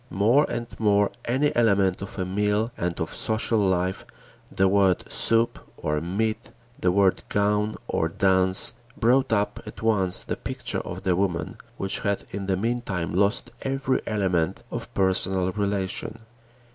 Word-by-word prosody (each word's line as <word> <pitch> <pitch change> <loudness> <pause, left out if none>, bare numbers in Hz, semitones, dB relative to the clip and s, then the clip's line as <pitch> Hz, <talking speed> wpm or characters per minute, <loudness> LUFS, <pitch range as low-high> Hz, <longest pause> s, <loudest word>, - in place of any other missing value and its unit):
More 115 +9 +3
and 120 0 -3
more 105 -2 +3
any 135 +5 +1
element 100 -6 +3
of 100 - -7
a 95 - -1
meal 105 +4 0
and 85 0 -3
of 80 - -3
social 110 0 0
life, 95 -1 0 0.5
the 95 - +2
word 95 -1 +3
soup 115 +1 +2 0.2
or 75 -1 -1
meat, 105 +6 -2 0.3
the 90 - +2
word 95 0 +3
gown 105 +1 +1
or 80 - 0
dance, 95 +3 +3 0.2
brought 130 +3 +3
up 105 -1 0
at - - -9
once 95 -5 +3
the - - -3
picture - - -3
of - - -7
the 90 -2 +2
woman, 90 -2 -1 0.2
which 95 - -1
had 100 -1 -1
in 100 0 -5
the 95 -1 +1
meantime 100 -6 -2
lost 100 +6 +1
every 135 -1 0
element 95 -6 0
of - - -6
personal 95 -1 +1
relation. 100 0 -2
100 Hz, 150 wpm, -25 LUFS, 95-110 Hz, 0.5 s, More